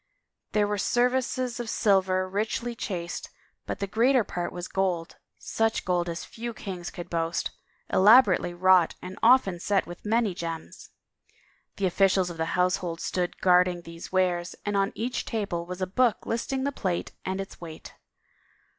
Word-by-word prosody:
There 210 Hz, -1 st, +3 dB
were 205 Hz, 0 st, -1 dB
services 250 Hz, +1 st, +1 dB
of 240 Hz, -2 st, -4 dB
silver, 190 Hz, -3 st, +2 dB
richly 215 Hz, +5 st, -2 dB
chased, 180 Hz, -6 st, -5 dB, 0.4 s
but -, -, -3 dB
the 200 Hz, -, -2 dB
greater 235 Hz, +5 st, +3 dB
part 175 Hz, -3 st, -4 dB
was 175 Hz, 0 st, -6 dB
gold, 180 Hz, -4 st, -1 dB, 0.2 s
such 225 Hz, 0 st, -1 dB
gold 175 Hz, -1 st, 0 dB
as 170 Hz, 0 st, -5 dB
few 235 Hz, 0 st, -6 dB
kings 180 Hz, -4 st, -6 dB
could 175 Hz, -, -8 dB
boast, 165 Hz, 0 st, -1 dB, 0.4 s
elaborately 205 Hz, -3 st, +5 dB
wrought 180 Hz, -1 st, +4 dB
and 185 Hz, +1 st, -8 dB
often 225 Hz, -7 st, +5 dB
set 195 Hz, +2 st, +1 dB
with 175 Hz, 0 st, -10 dB
many 220 Hz, -2 st, +1 dB
gems. 165 Hz, -2 st, -6 dB, 0.9 s
The 200 Hz, -, -1 dB
officials 190 Hz, 0 st, +3 dB
of 170 Hz, -, -9 dB
the 160 Hz, -, 0 dB
household 180 Hz, -2 st, 0 dB
stood 180 Hz, -1 st, -2 dB
guard 180 Hz, 0 st, +5 dB
ing 175 Hz, -1 st, -4 dB
these 165 Hz, 0 st, -10 dB
wares 180 Hz, -2 st, +1 dB
and 205 Hz, 0 st, -1 dB
on 195 Hz, 0 st, +2 dB
each 240 Hz, +3 st, -2 dB
table 195 Hz, -7 st, -3 dB
was 180 Hz, +1 st, -4 dB
a -, -, +2 dB
book 230 Hz, +5 st, +1 dB
listing 265 Hz, +3 st, -2 dB
the 280 Hz, -, 0 dB
plate 185 Hz, -9 st, -2 dB
and 190 Hz, +1 st, -3 dB
its 195 Hz, -2 st, -7 dB
weight. 160 Hz, -2 st, -9 dB
190 Hz, 165 wpm, -27 LUFS, 175-220 Hz, 0.9 s, elaborately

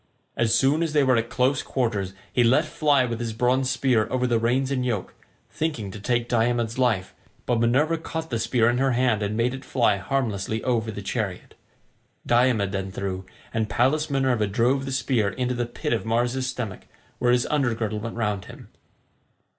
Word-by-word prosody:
As 115 Hz, 0 st, +2 dB
soon 135 Hz, +6 st, +3 dB
as 165 Hz, -2 st, -1 dB
they 150 Hz, -2 st, +4 dB
were 130 Hz, -1 st, +4 dB
at 115 Hz, 0 st, 0 dB
close 130 Hz, +1 st, +1 dB
quarters 105 Hz, -7 st, -2 dB, 0.2 s
he 125 Hz, -, +4 dB
let 120 Hz, +2 st, +4 dB
fly 145 Hz, -4 st, +2 dB
with 115 Hz, -2 st, -4 dB
his 115 Hz, -2 st, -3 dB
bronze 125 Hz, +3 st, +1 dB
spear 130 Hz, -4 st, +2 dB
over 125 Hz, -1 st, 0 dB
the 120 Hz, -2 st, +2 dB
reins 130 Hz, +4 st, +1 dB
and 130 Hz, -2 st, 0 dB
yoke, 115 Hz, -7 st, -2 dB, 0.4 s
thinking 135 Hz, -11 st, -3 dB
to 105 Hz, -, -8 dB
take 120 Hz, +3 st, 0 dB
Diomed's 120 Hz, 0 st, 0 dB
life, 110 Hz, -8 st, +1 dB, 0.3 s
but 120 Hz, -2 st, +1 dB
Minerva 145 Hz, +8 st, +2 dB
caught 160 Hz, -1 st, -5 dB
the 115 Hz, -, 0 dB
spear 115 Hz, 0 st, +2 dB
in 120 Hz, +1 st, +2 dB
her 135 Hz, -1 st, +2 dB
hand 120 Hz, -3 st, +2 dB
and 105 Hz, +1 st, -2 dB
made 120 Hz, +2 st, +1 dB
it 130 Hz, +1 st, -7 dB
fly 120 Hz, -7 st, +2 dB
harmlessly 110 Hz, -1 st, -2 dB
over 115 Hz, -3 st, 0 dB
the 105 Hz, -2 st, -6 dB
chariot. 100 Hz, -4 st, -4 dB, 0.7 s
Diomed 120 Hz, -5 st, +2 dB
then 95 Hz, -1 st, -3 dB
threw, 95 Hz, -1 st, -4 dB, 0.3 s
and 110 Hz, -1 st, -1 dB
Pallas 150 Hz, +7 st, +1 dB
Minerva 130 Hz, -6 st, +1 dB
drove 125 Hz, +7 st, +1 dB
the 135 Hz, -, -4 dB
spear 125 Hz, -5 st, +1 dB
into 125 Hz, +4 st, -2 dB
the 120 Hz, -1 st, -2 dB
pit 120 Hz, -, -3 dB
of 115 Hz, -, -1 dB
Mars's 120 Hz, +3 st, 0 dB
stomach 115 Hz, -7 st, -6 dB, 0.3 s
where 120 Hz, -, +3 dB
his 125 Hz, 0 st, +3 dB
under 135 Hz, -6 st, +1 dB
girdle 110 Hz, -2 st, -2 dB
went 115 Hz, +1 st, -6 dB
round 105 Hz, -5 st, -2 dB
him. -, -, -12 dB
120 Hz, 195 wpm, -24 LUFS, 110-130 Hz, 0.7 s, they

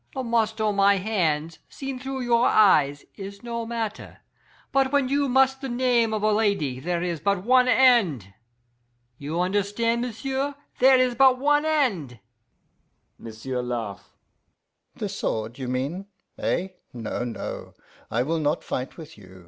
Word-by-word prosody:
The 260 Hz, -, -2 dB
must 225 Hz, -2 st, 0 dB
on 210 Hz, -2 st, 0 dB
my 200 Hz, 0 st, +5 dB
hands, 165 Hz, -6 st, -1 dB
seen 270 Hz, -2 st, -6 dB
through 265 Hz, 0 st, -5 dB
your 240 Hz, -1 st, +3 dB
eyes, 145 Hz, -9 st, +4 dB
is 200 Hz, +2 st, -9 dB
no 235 Hz, -1 st, -4 dB
matter, 225 Hz, -2 st, -5 dB, 0.5 s
but 270 Hz, -1 st, +2 dB
when 280 Hz, -3 st, +2 dB
you 280 Hz, 0 st, +1 dB
must 265 Hz, +1 st, +3 dB
the 270 Hz, -, -4 dB
name 240 Hz, -2 st, +2 dB
of 215 Hz, -1 st, -2 dB
a 215 Hz, -, +3 dB
lady 200 Hz, -, 0 dB
there 175 Hz, +4 st, -2 dB
is 170 Hz, -3 st, -2 dB
but 200 Hz, 0 st, 0 dB
one 255 Hz, +2 st, +4 dB
end. 210 Hz, -, +3 dB, 0.9 s
You 150 Hz, +4 st, -4 dB
understan', 205 Hz, +5 st, 0 dB
m'sieu', 265 Hz, +4 st, -3 dB, 0.2 s
there 260 Hz, +1 st, +6 dB
is 255 Hz, -1 st, +2 dB
but 260 Hz, +1 st, +5 dB
one 295 Hz, +3 st, +2 dB
end.' 205 Hz, -, 0 dB, 1.0 s
M'sieu' 115 Hz, +3 st, -5 dB
laugh. 115 Hz, -5 st, -5 dB, 0.8 s
'The -, -, -4 dB
sword, 110 Hz, +3 st, -3 dB
you 130 Hz, -, -4 dB
mean? 140 Hz, +10 st, -3 dB, 0.3 s
Eh? 185 Hz, +2 st, -1 dB, 0.2 s
No, 120 Hz, 0 st, -4 dB
no, 120 Hz, -2 st, -6 dB, 0.3 s
I 120 Hz, +2 st, 0 dB
will 160 Hz, +4 st, -1 dB
not 150 Hz, +1 st, 0 dB
fight 130 Hz, +1 st, -4 dB
with 160 Hz, -8 st, -11 dB
you. 95 Hz, -1 st, -15 dB
205 Hz, 150 wpm, -25 LUFS, -, 1.0 s, there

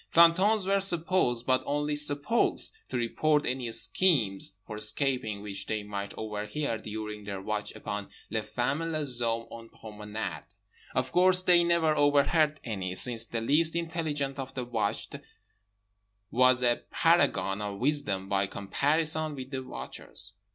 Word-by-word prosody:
Plantons 185 Hz, +5 st, +5 dB
were 195 Hz, +1 st, +2 dB
supposed—but 160 Hz, -9 st, +2 dB
only 145 Hz, +1 st, -1 dB
supposed—to 150 Hz, -, 0 dB
report 150 Hz, +6 st, +1 dB
any 125 Hz, -2 st, -2 dB
schemes 115 Hz, -, +2 dB
for 105 Hz, -, -7 dB
escaping 110 Hz, -1 st, 0 dB
which 100 Hz, -1 st, -5 dB
they 110 Hz, -1 st, -2 dB
might 100 Hz, -1 st, -5 dB
overhear 110 Hz, +4 st, -3 dB
during 105 Hz, -1 st, -6 dB
their 100 Hz, -1 st, -5 dB
watch 105 Hz, +2 st, -3 dB
upon 100 Hz, 0 st, -5 dB, 0.2 s
les 110 Hz, 0 st, 0 dB
femmes 125 Hz, +7 st, -2 dB
et 165 Hz, -, -2 dB
les 135 Hz, -5 st, 0 dB
hommes 115 Hz, 0 st, -1 dB
en 115 Hz, 0 st, -10 dB
promenade. 105 Hz, 0 st, -7 dB, 0.4 s
Of 130 Hz, 0 st, 0 dB
course 185 Hz, +1 st, +4 dB
they 175 Hz, -1 st, +5 dB
never 170 Hz, -2 st, +2 dB
overheard 150 Hz, +1 st, +3 dB
any, 95 Hz, -5 st, -4 dB
since 115 Hz, 0 st, +2 dB
the 115 Hz, 0 st, -4 dB
least 155 Hz, +7 st, +3 dB
intelligent 155 Hz, -5 st, -2 dB
of 135 Hz, 0 st, -6 dB
the 125 Hz, -2 st, -3 dB
watched 110 Hz, -4 st, -2 dB, 1.1 s
was 125 Hz, +1 st, +4 dB
a 120 Hz, -1 st, +2 dB
paragon 95 Hz, +1 st, +2 dB
of 100 Hz, -1 st, -4 dB
wisdom 120 Hz, -8 st, 0 dB
by 100 Hz, 0 st, +1 dB
comparison 150 Hz, +10 st, +1 dB
with 130 Hz, 0 st, -8 dB
the 130 Hz, -1 st, -3 dB
watchers. 90 Hz, -, -5 dB
125 Hz, 140 wpm, -29 LUFS, 105-155 Hz, 1.1 s, Plantons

